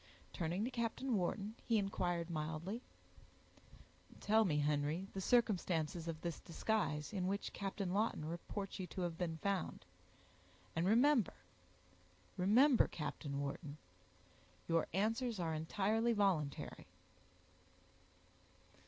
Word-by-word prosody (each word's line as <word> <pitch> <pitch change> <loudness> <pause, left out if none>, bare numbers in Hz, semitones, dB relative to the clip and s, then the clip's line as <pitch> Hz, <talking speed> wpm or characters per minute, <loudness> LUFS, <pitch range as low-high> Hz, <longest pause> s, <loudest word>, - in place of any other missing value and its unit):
Turning 175 +4 -1
to 255 - -3
Captain 235 +1 -1
Wharton, 200 +3 -1
he 230 - +2
inquired 175 -4 -1
mildly,— 160 +8 -3 1.4
"Tell 220 +1 +4
me, 155 -6 +2
Henry, 150 +4 +1
the 195 - -3
circumstances 175 -8 +2
of 160 -1 -4
this 170 -1 -3
disguise, 165 -4 -1
in 185 -3 0
which 200 +1 -2
Captain 195 -2 -3
Lawton 205 -6 +1
reports 195 +5 -5
you 185 - -3
to 185 - -5
have 175 -2 -1
been 165 -2 -2
found, 200 -2 -1 0.9
and 165 +2 +1
remember—remember—Captain 145 - +1
Wharton—your 150 +3 -5
answers 225 +4 0
are 165 -2 0
entirely 210 +9 +1
voluntary." 185 -9 0
180 Hz, 100 wpm, -38 LUFS, 155-210 Hz, 1.4 s, Tell